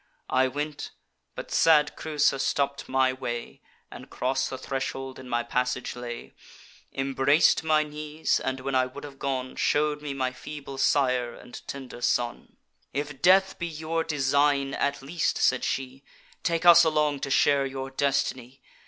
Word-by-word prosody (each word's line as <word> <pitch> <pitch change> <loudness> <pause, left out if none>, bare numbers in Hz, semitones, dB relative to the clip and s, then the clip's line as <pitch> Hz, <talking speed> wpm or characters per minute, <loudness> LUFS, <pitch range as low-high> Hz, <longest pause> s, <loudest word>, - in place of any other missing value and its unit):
I 130 0 +3
went; 145 +2 -4 0.5
but - - -7
sad 150 -2 +4
Creusa 150 -3 +1
stopp'd 140 +1 -1
my 130 0 +2
way, 120 -2 -6 0.3
And - - -11
cross 135 +1 -1
the 130 - -5
threshold 135 0 -4
in 130 -1 -10
my 120 0 0
passage 125 +1 -2
lay, 120 -1 -7 0.6
Embrac'd 135 +4 +3
my 155 -1 +3
knees, 150 +1 -2
and, 130 0 -3
when 135 +1 -3
I 130 -1 +3
would 135 +3 -10
have 140 -2 -10
gone, 130 -2 -3
Shew'd 150 0 +1
me 145 -2 -5
my 130 -1 -1
feeble 140 -1 -8
sire 125 -4 +2
and 125 - -11
tender 130 -3 -7
son: 120 -1 -1 0.4
'If 145 -1 -4
death 190 +1 +4
be 170 - -2
your 160 +1 -2
design, 140 -1 +1
at 140 -1 -1
least,' 160 +4 -1
said 125 -1 +2
she, 135 +1 -3 0.4
'Take 170 0 -1
us 170 0 +9
along 150 -3 +1
to 140 - -4
share 140 0 +3
your 135 0 -6
destiny. 135 -2 -1
135 Hz, 155 wpm, -27 LUFS, 130-150 Hz, 0.6 s, us